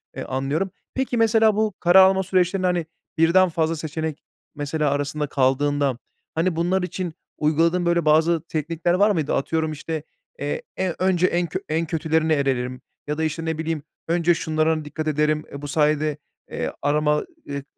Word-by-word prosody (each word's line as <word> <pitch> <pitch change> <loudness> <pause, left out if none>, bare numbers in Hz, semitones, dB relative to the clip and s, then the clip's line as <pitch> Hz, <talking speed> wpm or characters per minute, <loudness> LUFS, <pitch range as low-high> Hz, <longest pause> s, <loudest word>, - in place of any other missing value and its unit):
eee, - - -4
anlıyorum. 140 +8 -2 0.2
Peki, 260 -2 -1
mesela 225 -1 +4
bu 215 -2 +1
karar 180 +2 +7
alma 190 0 +1
süreçlerinde, 185 0 +1
hani, 175 -2 0 0.3
birden 175 +3 +5
fazla 160 0 0
seçenek 155 0 -4 0.3
mesela 145 +1 -1
arasında 145 +1 -1
kaldığında, 140 0 +1 0.4
hani, 165 +1 +1
bunlar 180 +3 +1
için 180 -2 -4 0.2
uyguladığın 165 +3 +2
böyle 170 -2 +2
bazı 160 +2 +4
teknikler 165 +2 -1
var 205 +3 +4
mıydı? 155 -6 0
Atıyorum, 160 +3 0
işte, 155 +1 -5 0.4
eee, 485 - -2 0.2
eee, 185 -3 -1
önce 185 -1 +3
en 175 -1 0
kö 185 - -3
en 160 +2 0
kötülerine 160 0 +1
elerim 130 -3 -1 0.3
ya 150 +1 -2
da, 160 - -1
işte, 160 +1 -2
ne 160 -1 -2
bileyim, 160 -1 -3 0.2
önce 170 +1 +3
şunlara 155 -1 0
dikkat 155 +1 -5
ederim, 150 0 +1
eee, 140 - -7
bu 145 - -5
sayede, 150 0 +1 0.3
eee, - - -2
arama 150 +1 +2 0.3
ııı, 140 -1 -4
160 Hz, 165 wpm, -23 LUFS, 150-175 Hz, 0.4 s, karar